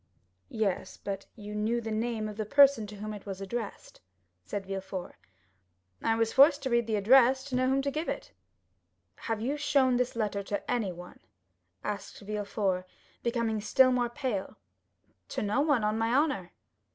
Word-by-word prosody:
"Yes; 210 -4 -2
but 200 -1 -5
you 210 -2 -8
knew 215 +3 0
the 225 -1 -5
name 220 0 -1
of 210 - -6
the 215 - -2
person 280 -4 +5
to 210 - -9
whom 215 +1 -5
it 205 -1 -10
was 195 -1 -5
addressed," 205 +2 -6 0.4
said 195 - -5
Villefort. 190 -1 -5 0.9
"I 225 - +2
was 225 0 +1
forced 280 +1 +6
to 260 - -2
read 235 -1 +2
the 220 - 0
address 255 +5 +5
to 265 -2 -4
know 255 0 +2
to - - +2
whom 270 +1 +2
to 280 - 0
give 310 +4 -3
it." - - -5 0.8
"Have 225 -2 -3
you 275 +6 -1
shown 270 -4 +3
this 250 -1 -1
letter 210 -3 -1
to 200 +1 -4
anyone?" 185 -7 -3 0.6
asked 205 -1 -5
Villefort, 200 -3 -2 0.3
becoming 235 -3 0
still 255 +5 +5
more 245 -1 +1
pale. 240 -7 -3 0.7
"To - - -3
no 210 +7 +1
one, 290 -7 +2
on 215 +1 +1
my 225 +1 +1
honor." 275 - +1
225 Hz, 175 wpm, -29 LUFS, 205-255 Hz, 0.9 s, forced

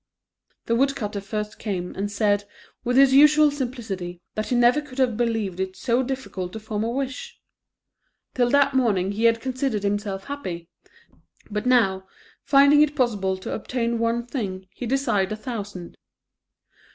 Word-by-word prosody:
The 230 - 0
woodcutter 235 -6 0
first 210 +1 -5
came, 185 -5 -4
and 205 +1 -3
said, 205 -1 +1 0.4
with 245 +1 0
his 270 -1 +6
usual 300 +1 +6
simplicity, 225 -10 -5
that 215 0 -3
he 250 - 0
never 240 +4 +4
could 285 -3 -13
have 255 -4 +2
believed 225 -5 -1
it 190 0 -3
so 245 0 +1
difficult 255 -9 -4
to 220 - -5
form 215 -1 -3
a 225 - -1
wish. 275 - -4 0.9
Till 245 -1 +2
that 280 +1 +3
moment 205 -7 +1
he 220 +3 0
had 230 0 +4
considered 255 -4 -2
himself 200 -1 -2
happy, 185 -13 -6 0.8
but 210 +4 -2
now 195 -7 +3 0.4
finding 280 +1 +6
it 300 0 +2
possible 205 -8 0
to 185 - -6
obtain 235 0 -2
one 230 +1 0
thing, 195 -7 -4
he 245 - -6
desired 235 -7 +1
a - - -5
thousand. 205 -7 -7
230 Hz, 155 wpm, -24 LUFS, 200-260 Hz, 0.9 s, his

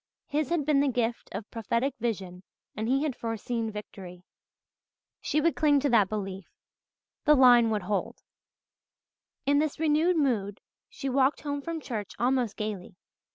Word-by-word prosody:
His 300 -1 -1
had 335 -4 0
been 295 -2 +3
the 285 - +3
gift 240 -2 -1
of 200 +2 -7
prophetic 235 +4 -1
vision 190 -6 -3 0.3
and 220 +2 -3
he 270 +4 +2
had 295 -5 -1
foreseen 225 0 -3
victory. 190 -4 -9 1.0
She 305 - 0
would 335 +2 +2
cling 290 -2 +4
to 285 - +1
that 210 -5 +4
belief 195 -3 -5 0.8
the 300 0 +6
line 245 -3 +6
would 210 -3 -1
hold. 200 +2 -3 1.2
In 285 +1 +3
this 305 -1 -1
renewed 320 +3 +2
mood 215 -9 0 0.3
she 405 - -6
walked 265 +1 +2
home 285 -1 -3
from 330 +2 -4
church 220 -8 -5
almost 245 -3 0
gaily. 205 -4 -5
245 Hz, 155 wpm, -28 LUFS, 210-285 Hz, 1.2 s, the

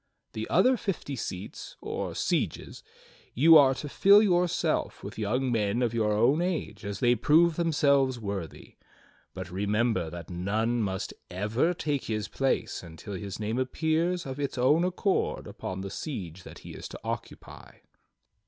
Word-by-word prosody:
The - - -5
other 255 0 +4
fifty 170 -9 -3
seats, 95 -4 -7
or - - -4
sieges, - - -2 0.5
you 160 +6 +7
are 135 -3 +7
to 140 +4 -6
fill 200 +8 +6
yourself 180 -3 +1
with - - -7
young 125 +5 0
men 110 +1 +1
of 120 -1 0
your 110 -2 +1
own 120 +9 +3
age 175 -8 -3
as 100 +2 -5
they 120 -1 +5
prove 155 +8 +4
themselves 140 -6 +2
worthy. 100 -6 -6 0.6
But 90 - -6
remember, 105 -1 0
that 85 +1 -9
none 110 +7 0
must 95 -3 -3 0.2
ever 110 - 0
take 145 -4 -2
his 110 -3 -2
place 135 +5 -1
until 85 +4 -9
his 100 +1 -6
name 110 +3 -2
appears 160 +6 0
of 135 +1 -6
its 140 -2 -3
own 145 +7 +4
accord 185 +2 0
upon 95 0 -6
the 100 0 -6
siege 95 - -6
that - - -11
he - - -8
is - - -8
to - - -9
occupy." - - -7
120 Hz, 155 wpm, -28 LUFS, 100-155 Hz, 0.6 s, you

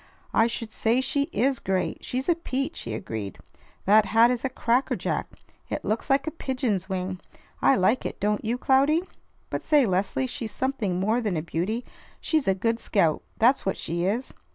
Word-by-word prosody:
"I 225 - +4
should 230 -1 -4
say 230 +3 +1
she 280 +3 0
is 260 +1 +1
great! 190 -1 -2
She's 255 +1 -3
a 345 - +5
peach!" 275 -5 -3
he 115 -2 -4
agreed. 110 -4 -5 0.5
"That 210 +2 +6
hat 230 +2 +5
is 245 -1 -2
a 265 - 0
cracker 245 +1 +1
jack! - - -2 0.4
It - - -4
looks 215 +2 -1
like 275 0 +3
a 315 - -2
pigeon's 250 - -2
wing. 185 -1 -3 0.4
I 275 - +5
like 215 +4 +2
it; - - -5
don't 210 +1 0
you, 230 +2 -1
Cloudy? 280 +6 +3 0.5
But - - -2
say, 295 -4 +4
Leslie, 195 +6 0
she's 245 -3 -4
something 220 -9 -1
more 220 +6 +1
than 205 -7 -1
a 155 - -2
beauty. 195 +9 -2 0.3
She's 310 -7 0
a 190 - +3
good 230 +4 0
scout. 170 -9 +1 0.2
That's 245 +4 +4
what 195 - -1
she 170 +2 -2
is. 230 +7 -1
230 Hz, 190 wpm, -26 LUFS, 190-265 Hz, 0.5 s, That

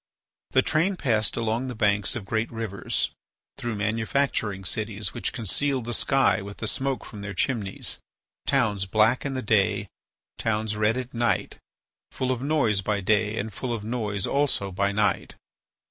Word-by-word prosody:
The 130 - +4
train 170 +5 +2
passed 115 - +1
along 115 +2 0
the 125 - -4
banks 105 -2 +2
of 115 -5 -4
great 110 +3 -1
rivers, 110 -4 -2 0.5
through 120 -2 -2
manufacturing 110 -1 0
cities 110 +1 -2
which - - -2
concealed 130 +2 -1
the 120 - -2
sky 135 -3 +3
with 100 +1 -8
the - - -4
smoke 135 +3 -1
from 105 - -8
their 100 -2 -5
chimneys, 105 -3 -1 0.5
towns 105 -8 +2
black 110 +7 +3
in 135 - -3
the 130 - -2
day, 105 -3 +2 0.5
towns 110 -1 0
red 105 +3 +2
at 130 0 -5
night, 120 -1 0 0.5
full 130 0 -1
of 125 -1 -1
noise 135 -9 +2
by 105 +1 0
day 105 +2 +2
and 110 0 -3
full 125 +5 -3
of 115 -3 -2
noise 105 -4 -1
also 135 -9 +1
by 100 +2 +1
night. 100 -1 +1
110 Hz, 160 wpm, -26 LUFS, 105-125 Hz, 0.5 s, The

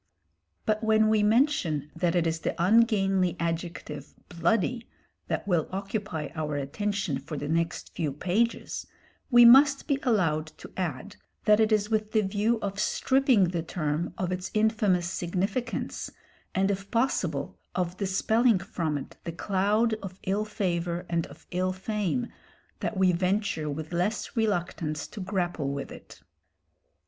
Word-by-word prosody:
But 215 +1 0
when 220 0 +4
we 215 -1 +3
mention 210 - +2
that 175 -1 0
it 175 -1 +2
is 165 0 0
the - - -2
ungainly 195 -2 +3
adjective 165 -3 -4
"bloody" 225 +6 0 0.4
that - - -2
will 175 -5 +1
occupy 195 -5 -3
our 155 -2 -3
attention 170 +2 -2
for 145 +3 -7
the 145 - -4
next 165 +2 -1
few 160 -4 -1
pages, 190 +11 -1 0.4
we 240 -2 +8
must 275 +4 +7
be 280 -3 +1
allowed 165 -10 +1
to - - -11
add 185 +2 -4 0.3
that 210 0 +5
it 220 0 +3
is 210 0 +2
with 215 -1 0
the 215 - +4
view 210 +4 +1
of 200 0 -3
stripping 255 -4 +3
the 175 -2 -1
term 160 0 -2
of 185 -1 -2
its 185 0 -3
infamous 210 -5 +2
significance, 190 +7 -2 0.5
and 195 +1 +2
if 195 0 -4
possible 185 - -1 0.2
of 180 0 -1
dispelling 220 +4 +2
from 175 -6 -2
it 135 - -9
the 170 - -4
cloud 205 +6 +1
of 185 -1 -7
ill 200 +3 0
favour 175 -4 -2
and 170 -1 0
of - - -15
ill 185 +1 0
fame, 210 +4 -1 0.5
that 215 - -3
we 190 -1 +4
venture 180 -3 0
with 155 +3 -5
less 205 +9 -1
reluctance 175 -8 -1
to 215 - -10
grapple 175 -6 -1
with 140 0 -4
it. - - -13
190 Hz, 150 wpm, -28 LUFS, 170-215 Hz, 0.5 s, we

